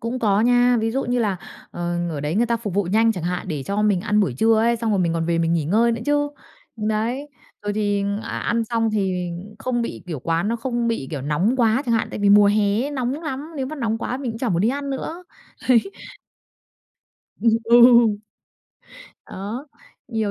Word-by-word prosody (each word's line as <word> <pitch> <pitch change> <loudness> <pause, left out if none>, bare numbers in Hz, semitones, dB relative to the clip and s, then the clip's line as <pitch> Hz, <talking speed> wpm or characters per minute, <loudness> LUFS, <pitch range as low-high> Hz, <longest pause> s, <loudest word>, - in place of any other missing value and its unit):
Cũng 235 +2 -3
có 210 -3 +2
nha, 245 +1 +4
ví 225 0 0
dụ 270 +3 -1
như 245 +1 0
là, 210 -5 0 0.3
ờ, 175 0 -3
ở 145 -3 -4
đấy 150 +4 -2
người 235 +3 +2
ta 235 0 +1
phục 210 -5 -5
vụ 205 - +2
nhanh 225 +5 +3
chẳng 180 -4 -6
hạn, 180 +1 -3
để 150 -4 -3
cho 200 +7 -1
mình 205 -4 +2
ăn 210 +1 +1
buổi 145 -12 0
trưa 225 0 +4
ấy, 235 +1 +2
xong 225 -1 -2
rồi 200 - +1
mình 170 -2 +1
còn 165 0 -1
về 170 -1 +1
mình 165 0 +1
nghỉ 165 -3 +1
ngơi 225 +8 +3
nữa 230 - -3
chứ. 290 0 +2 0.5
Đấy, 225 +6 -2 0.3
rồi 205 - -2
thì 205 -1 0 0.2
ăn - - -5
ăn 230 -1 0
xong 225 -1 0
thì 185 -4 -1 0.3
không 240 -2 -1
bị - - -5
kiểu, 160 -5 -4
quán 165 +6 0
nó 235 - 0
không 240 0 -2
bị, 225 -13 -2
kiểu, 145 -4 -4
nóng 175 - +1
quá 235 +2 +2
chẳng 235 - +2
hạn, 225 - 0
tại - - -5
vì 205 0 +3
mùa 205 0 +7
hè 205 +2 +2
ấy 285 - -3
nóng 270 +2 -3
lắm, 300 0 -5
nếu 265 - -2
mà 310 +3 -6
nóng 225 -4 -1
quá 245 - -3
mình 260 -3 -4
cũng 225 - -7
chả 245 -1 -1
muốn 175 -2 +1
đi 220 - +3
ăn 280 +1 -3
nữa, 325 +6 -5 0.4
ấy. 250 - +7 1.6
Ừm, 230 - +3 0.2
ừ. 240 - +8 1.5
Đó, 215 +9 -6 0.4
nhiều 220 -3 -1
220 Hz, 225 wpm, -22 LUFS, 195-240 Hz, 1.6 s, ừ